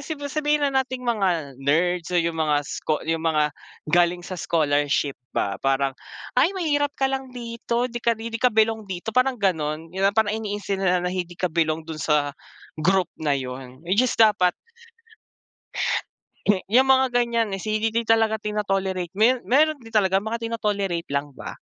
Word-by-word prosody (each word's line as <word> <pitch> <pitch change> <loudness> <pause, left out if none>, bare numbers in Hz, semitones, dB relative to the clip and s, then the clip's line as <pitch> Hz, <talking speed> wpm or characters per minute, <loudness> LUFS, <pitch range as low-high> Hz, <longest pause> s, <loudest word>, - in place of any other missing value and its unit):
sige 290 0 -6
sabihin 300 -1 +1
na 275 - +1
nating 255 -1 -5
mga 175 - 0
nerds 165 +4 +1
o - - +4
yung 165 -1 0
mga 150 -2 +2
sko 155 +2 -2
yung 165 0 -1
mga 150 -1 +2 0.4
galing 175 0 +3
sa 185 -1 -6
scholarship 145 -3 +1 0.2
ba 100 -1 0
parang, 135 0 +1 0.4
"Ay 310 +9 +4
mahirap 290 -5 +1
ka 270 - 0
lang 265 -1 -3
dito", 235 0 -2
"'Di 240 0 -5
ka 235 - +3
'di 230 +1 -5
ka 250 - +5
belong 220 0 +2
dito", 190 +4 -5
parang 255 +2 +2
gano'n, 160 -5 -1 0.2
parang 220 -1 +3
ini-instill 205 -2 -3
nila 180 -2 +2
na 180 - -1
hindi 180 -2 -3
ka 180 - 0
belong 160 -1 0
dun 160 -1 -7
sa 145 -2 +1 0.5
group 185 +3 +2
na 150 -2 +1
yun, 130 0 -7
which 190 +6 +2
is 255 - +2
dapat 210 -5 +5 1.9
Eh, 200 -2 +3
yung 260 +4 +5
mga 265 -1 +4
gan'yan, 235 -3 +1
eh, - - -7
si 215 +3 -3 0.3
talaga 225 -1 +3
tino-tolerate 195 -4 -2
meron 245 +3 +4
meron 305 +4 +3
din 225 - -12
talaga 195 -3 +2
mga 220 +2 -3
tino-tolerate 200 -6 -2
lang 140 0 -2
ba. - - -8
195 Hz, 170 wpm, -24 LUFS, 160-230 Hz, 1.9 s, ka